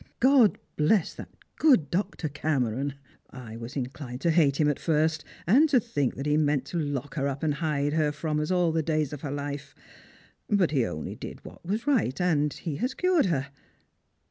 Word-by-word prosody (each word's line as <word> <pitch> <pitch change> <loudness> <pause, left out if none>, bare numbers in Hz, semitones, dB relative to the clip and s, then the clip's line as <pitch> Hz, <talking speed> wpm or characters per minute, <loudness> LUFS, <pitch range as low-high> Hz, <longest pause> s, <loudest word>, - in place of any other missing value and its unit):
God 255 -4 +5 0.2
bless 160 +4 +2
that - - -9 0.3
good 255 - +4
Dr. 175 -3 -1
Cameron! 140 -2 -1 0.3
I 120 -4 -9
was 115 +4 -8
in 135 -3 -1
clined 125 -1 -8
to 170 - +2
hate 150 -4 +3
him 150 - +4
at 145 - 0
first, 160 -1 +1 0.2
and 275 - +5
to 270 -3 +5
think 145 - -1
that 135 - -5
he 150 0 +2
meant 145 -3 +1
to 175 - -2
lock 145 -2 -3
her 140 -3 -1
up 140 +1 -4
and 155 -2 +2
hide 145 -1 -1
her 155 -2 +2
from 150 0 -2
us 150 - -2
all 180 -2 +2
the 160 0 +1
days 155 -2 -1
of 145 - -7
her 145 - -4
life. 145 0 -5 0.7
But 200 -7 +3
he 130 -7 +2
only 75 - -5
did - - -9
what - - -12
was 210 +7 -2
right, 230 - +1
and 150 -5 +2
he 155 -2 -5
has 255 +4 -2
cured 360 - +2
her. 140 -5 -1
150 Hz, 200 wpm, -27 LUFS, 140-175 Hz, 0.7 s, God